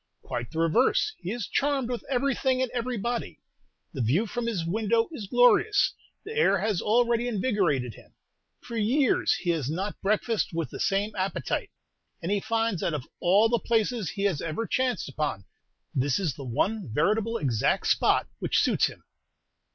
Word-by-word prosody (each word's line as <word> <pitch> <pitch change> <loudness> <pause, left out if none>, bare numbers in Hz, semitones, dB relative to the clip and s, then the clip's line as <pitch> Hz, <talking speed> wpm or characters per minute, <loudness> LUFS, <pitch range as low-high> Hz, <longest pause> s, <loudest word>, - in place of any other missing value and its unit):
"Quite 120 -2 -4
the 160 - -9
reverse; 225 - +2
he 175 - -6
is 235 -2 -3
charmed 275 -3 0
with 245 -1 -4
everything 265 0 +1
and 255 - -3
everybody. 240 -1 -3 0.5
The 135 - -3
view 140 - +2
from 240 +1 -3
his 190 -8 -1
window 220 +5 +1
is 225 -11 -7
glorious; 245 - +4 0.3
the 435 - -6
air 460 - +3
has 210 -5 0
already 235 +2 +2
invigorated 185 - 0
him. - - -18 0.5
For 235 - -8
years 235 +5 +2
he 175 - -1
has 150 -6 -2
not 190 +6 -4
breakfasted 210 -2 0
with 165 - -2
the - - -7
same 200 +2 0
appetite; 190 0 -2 0.5
and 175 +2 -3
he 205 - +2
finds 225 -3 -1
that 165 - 0
of 135 -4 -5
all 195 +5 +4
the 235 0 +1
places 225 -4 0
he 200 - -4
has 190 -8 +1
ever 165 +8 -3
chanced 255 0 0
upon, 140 -8 -3 0.5
this 135 0 +1
is 175 -8 -1
the 140 - -9
one 190 - -1
veritable 215 - +1
exact 120 -7 0
spot - - +3
which - - 0
suits - - +3
him." - - -12
210 Hz, 170 wpm, -27 LUFS, 165-240 Hz, 0.5 s, glorious